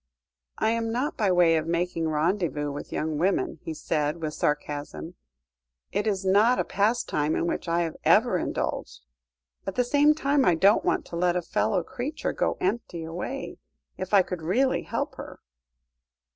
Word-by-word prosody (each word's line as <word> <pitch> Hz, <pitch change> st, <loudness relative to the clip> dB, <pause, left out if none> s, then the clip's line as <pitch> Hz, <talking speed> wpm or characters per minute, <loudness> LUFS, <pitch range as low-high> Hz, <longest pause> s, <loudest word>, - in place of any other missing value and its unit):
"I 220 Hz, -, +2 dB
am 230 Hz, 0 st, -1 dB
not 260 Hz, +7 st, -1 dB
by 205 Hz, -4 st, +1 dB
way 175 Hz, -2 st, +4 dB
of 155 Hz, 0 st, -2 dB
making 170 Hz, -1 st, -1 dB
rendezvous 155 Hz, -2 st, 0 dB
with 145 Hz, -, -7 dB
young 155 Hz, -1 st, -2 dB
women," 180 Hz, -2 st, 0 dB
he 160 Hz, -, -5 dB
said 150 Hz, +1 st, -1 dB
with 155 Hz, -2 st, -3 dB
sarcasm; 150 Hz, +3 st, -3 dB, 0.8 s
"it 210 Hz, -, -1 dB
is 195 Hz, -2 st, -1 dB
not 210 Hz, +6 st, +4 dB
a -, -, +1 dB
pastime 200 Hz, -7 st, 0 dB
in -, -, 0 dB
which 170 Hz, -, -2 dB
I 170 Hz, +1 st, +1 dB
have 165 Hz, -2 st, -2 dB
ever -, -, +4 dB
indulged. -, -, -4 dB, 0.6 s
At 195 Hz, -, -3 dB
the 250 Hz, -, +3 dB
same 290 Hz, +4 st, +4 dB
time, 280 Hz, -2 st, +2 dB
I 180 Hz, -, +4 dB
don't 200 Hz, +6 st, +4 dB
want -, -, 0 dB
to -, -, -8 dB
let 175 Hz, +1 st, +1 dB
a 180 Hz, -, +1 dB
fellow 190 Hz, +1 st, 0 dB
creature 265 Hz, -, -4 dB
go -, -, 0 dB
empty 185 Hz, -4 st, -2 dB
away, 180 Hz, +12 st, -5 dB, 0.4 s
if 185 Hz, 0 st, -6 dB
I 200 Hz, -2 st, +6 dB
could 180 Hz, -2 st, -5 dB
really 240 Hz, +12 st, +1 dB
help -, -, -4 dB
her." -, -, -9 dB
180 Hz, 170 wpm, -26 LUFS, 160-220 Hz, 0.8 s, I